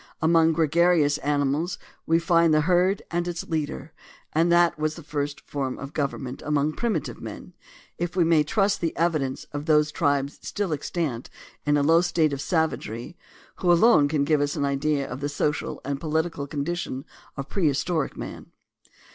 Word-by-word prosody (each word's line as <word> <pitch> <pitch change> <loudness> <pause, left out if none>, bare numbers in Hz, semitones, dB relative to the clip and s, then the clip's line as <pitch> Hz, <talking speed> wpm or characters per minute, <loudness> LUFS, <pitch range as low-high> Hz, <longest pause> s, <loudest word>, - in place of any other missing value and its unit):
Among 165 0 +4
gregarious 160 -1 +3
animals 145 +4 0 0.3
we 165 - +4
find 170 -1 +3
the 155 - +4
herd 180 +4 +2
and 175 0 -1
its 175 -1 -3
leader, 155 -1 -3 0.4
and 165 +2 +3
that 170 -1 +4
was 155 0 -1
the 165 - -10
first 145 -1 -3
form 135 -3 -4
of 140 +1 -8
government 135 -3 -3
among 150 0 +1
primitive 215 - -2
men, - - -8 0.5
if 175 +1 -3
we 180 - +4
may 165 -2 +4
trust 200 +6 +1
the 165 -2 -2
evidence 155 -6 0
of 145 +2 -5
those 150 -1 +4
tribes 140 -1 0
still 200 -5 -2
extant 145 -4 -3 0.4
in 145 0 +4
a 145 - +2
low 165 +3 +5
state 160 -4 +1
of 140 - -3
savagery 160 - -2 0.4
who 180 - +2
alone 170 -4 +5
can 145 -1 +1
give 150 0 +2
us 145 0 0
an 140 - 0
idea 140 0 0
of 130 - -6
the 145 +1 -2
social 145 0 -2
and 140 0 -3
political 160 -2 -1
condition 145 -2 -3 0.3
of 135 - -4
prehis 150 -8 0
toric 160 -6 -1
man. - - -7
155 Hz, 170 wpm, -25 LUFS, 145-170 Hz, 0.5 s, low